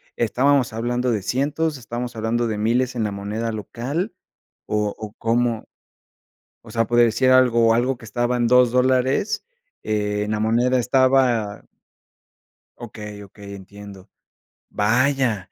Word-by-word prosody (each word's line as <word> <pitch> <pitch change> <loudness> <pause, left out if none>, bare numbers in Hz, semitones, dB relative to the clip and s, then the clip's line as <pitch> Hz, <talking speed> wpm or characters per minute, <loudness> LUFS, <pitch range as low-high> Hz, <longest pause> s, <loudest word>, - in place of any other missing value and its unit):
estábamos 130 +1 +1
hablando 120 +2 -1
de 105 -4 -1
cientos, 145 +7 -1
estamos 120 0 -6
hablando 115 +2 -1
de 110 -2 -3
miles 125 +4 0
en 115 - -1
la 105 - -1
moneda 105 +3 -4
local, 130 - -4 0.5
o, 105 -1 -1
o 105 -1 -8
cómo 115 0 -1 1.0
o 115 - -14
sea, 115 0 0
por 120 +1 +1
decir 120 +2 +3
algo 120 -3 +4
algo, 125 +2 0
que 115 - -13
estaba 120 +2 -1
en 120 - +1
2 125 0 +5
dólares, 130 - +1 0.4
en 105 0 -1
la 105 0 -1
moneda 120 +3 +2
estaba 125 -4 +2 1.1
okey, 105 -3 -9
okey, 100 0 -12
entiendo. 100 0 -12 0.6
Vaya, 120 -2 +1
120 Hz, 130 wpm, -22 LUFS, 105-125 Hz, 1.1 s, 2